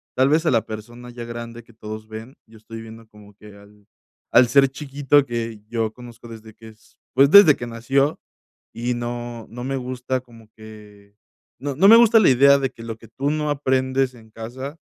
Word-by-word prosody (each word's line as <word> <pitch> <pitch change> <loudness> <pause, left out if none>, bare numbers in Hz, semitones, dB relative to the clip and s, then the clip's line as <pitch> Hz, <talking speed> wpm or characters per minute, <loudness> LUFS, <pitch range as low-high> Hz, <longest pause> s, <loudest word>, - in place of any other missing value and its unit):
tal 130 +1 +3
vez 160 +3 +1
a - - +2
la 115 -3 +1
persona 120 +3 -9
ya 120 -1 -9
grande 115 0 -8
que 115 - -22
todos 110 0 -9
ven, 110 +4 -10
yo 110 0 -18
estoy 115 +1 -10
viendo 115 0 -13
como 105 -1 -18
que 105 0 -16
al 100 0 -20 0.4
al 125 0 +6
ser 135 +2 +5
chiquito 140 +1 0
que 115 -3 -5
yo 110 -1 -3
conozco 120 -1 -13
desde 110 -1 -12
que 110 +1 -15
es, 110 0 -20 0.2
pues, 135 +2 +5
desde 200 -8 +8
que 120 - -7
nació 135 +6 -1 0.5
y 120 +1 -3
no 120 -1 -6
no 120 +1 -8
me 135 +1 -3
gusta 130 0 -4
como 115 -3 -19
que, 105 -2 -15 0.5
no 140 -1 -4
no 195 +5 +5
me 225 - +9
gusta 230 -1 +6
la 200 - +4
idea 140 +2 +5
de 135 -1 -2
que 115 - -13
lo 115 -1 -7
que 115 - -16
tú 140 +2 -3
no 150 -1 -2
aprendes 130 -2 0
en 110 -2 -18
casa, 130 +6 -8
120 Hz, 205 wpm, -21 LUFS, 110-135 Hz, 0.5 s, me